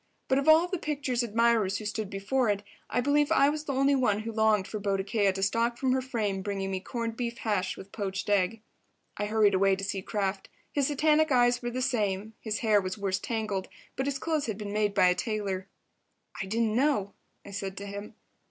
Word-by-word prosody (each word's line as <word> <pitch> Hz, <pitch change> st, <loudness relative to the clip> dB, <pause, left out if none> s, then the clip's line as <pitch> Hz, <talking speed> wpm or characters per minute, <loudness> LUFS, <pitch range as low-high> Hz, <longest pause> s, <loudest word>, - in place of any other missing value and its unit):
But 265 Hz, -, +4 dB
of 275 Hz, -, -3 dB
all 320 Hz, +3 st, +7 dB
the 370 Hz, -1 st, -3 dB
picture's 280 Hz, -5 st, -1 dB
admirers 230 Hz, -3 st, +2 dB
who 215 Hz, -, -7 dB
stood 210 Hz, -1 st, -3 dB
before 215 Hz, +5 st, 0 dB
it, 205 Hz, 0 st, 0 dB, 0.3 s
I 245 Hz, -, +1 dB
believe 290 Hz, +2 st, +2 dB
I 275 Hz, -, +5 dB
was 305 Hz, +1 st, -3 dB
the 280 Hz, -, -2 dB
only 275 Hz, +2 st, +3 dB
one 215 Hz, -6 st, +2 dB
who 230 Hz, +1 st, -4 dB
longed 220 Hz, -3 st, +2 dB
for 215 Hz, -, -4 dB
Boadicea 200 Hz, 0 st, +1 dB
to 195 Hz, 0 st, -3 dB
stalk 230 Hz, +4 st, +1 dB
from 260 Hz, 0 st, +1 dB
her 260 Hz, 0 st, +2 dB
frame, 215 Hz, -7 st, -2 dB
bringing 195 Hz, -1 st, -3 dB
me 190 Hz, -, -1 dB
corned 230 Hz, +3 st, -4 dB
beef 235 Hz, -1 st, -3 dB
hash 200 Hz, -4 st, -1 dB
with 195 Hz, -, -11 dB
poached 195 Hz, -3 st, -3 dB
egg. 205 Hz, +2 st, +1 dB, 0.6 s
I 205 Hz, -, -1 dB
hurried 210 Hz, -1 st, +3 dB
away 195 Hz, 0 st, +4 dB
to 195 Hz, -, -7 dB
see 195 Hz, -1 st, -2 dB
Kraft. 195 Hz, -1 st, -2 dB, 0.2 s
His 280 Hz, -2 st, +1 dB
satanic 305 Hz, +1 st, +3 dB
eyes 245 Hz, -1 st, +4 dB
were 240 Hz, -, -2 dB
the 255 Hz, +1 st, -2 dB
same, 210 Hz, -3 st, -1 dB
his 215 Hz, -2 st, -3 dB
hair 210 Hz, -2 st, +5 dB
was 185 Hz, +1 st, -4 dB
worse 195 Hz, -2 st, -1 dB
tangled, 215 Hz, -5 st, -2 dB, 0.3 s
but 265 Hz, -, -2 dB
his 280 Hz, -1 st, -1 dB
clothes 310 Hz, -1 st, -1 dB
had 215 Hz, -3 st, -3 dB
been 205 Hz, -1 st, -5 dB
made 210 Hz, -1 st, +1 dB
by 195 Hz, -, +5 dB
a 180 Hz, -, +5 dB
tailor. 200 Hz, -3 st, -3 dB, 0.7 s
"I 190 Hz, -, -4 dB
didn't 220 Hz, +1 st, 0 dB
know," 255 Hz, -7 st, +1 dB, 0.3 s
I 200 Hz, -, -9 dB
said 195 Hz, -1 st, -5 dB
to 200 Hz, -, -6 dB
him. 200 Hz, +2 st, -7 dB
215 Hz, 215 wpm, -29 LUFS, 195-250 Hz, 0.7 s, all